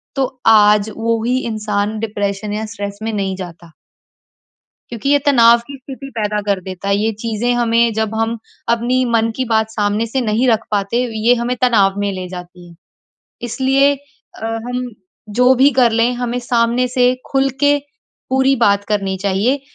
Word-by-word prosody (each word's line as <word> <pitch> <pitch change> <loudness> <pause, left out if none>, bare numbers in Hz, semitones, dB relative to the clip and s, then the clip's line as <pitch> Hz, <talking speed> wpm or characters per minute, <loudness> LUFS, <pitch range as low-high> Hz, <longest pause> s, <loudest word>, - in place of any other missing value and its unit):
तो 265 -1 -2
आज 210 -1 +5
वो 225 0 -1
ही 250 +2 +1
इंसान 215 -1 -2
डिप्रेशन 205 -1 -3
या 215 +1 -3
स्ट्रेस 205 -2 -6
में 225 - -2
नहीं 195 -2 -2
जाता। 170 -2 -10 1.2
क्योंकि 240 +3 -3
ये 285 0 +4
तनाव 235 -4 +6
की 280 - -8
स्थिति 270 +1 -10
पैदा 210 -1 -1
कर 200 -2 +1
देता 185 +1 -7
है, 200 - +3
ये 220 +2 0
चीज़ें 230 +2 -1
हमें 235 -1 +2
जब 220 0 -2
हम 225 +1 -1 0.3
अपनी 240 +2 +1
मन 230 0 +2
की 260 - -2
बात 220 -1 +1
सामने 210 +1 0
से 260 +3 -1
नहीं 230 +3 +1
रख 225 0 +2
पाते, 205 +3 0 0.3
ये 245 - +7
हमें 240 +1 -2
तनाव 205 -5 +3
में 200 0 -1
ले 185 -1 -5
जाती 180 -1 -10
है, 170 - -16 0.7
इसलिए 275 +3 +2 0.5
अ, - - -2 0.2
हम 250 0 -3 0.5
जो 250 +1 +6
भी 270 +3 +5
कर 245 -2 +4
लें 230 +2 +2
हमें 245 0 -3
सामने 240 +1 +1
से 250 0 +2 0.2
खुल 270 0 +2
के 290 0 +4 0.5
पूरी 265 +1 +3
बात 200 -3 +2
करनी 195 -2 -1
चाहिए, 205 +8 +1
225 Hz, 175 wpm, -17 LUFS, 205-250 Hz, 1.2 s, ये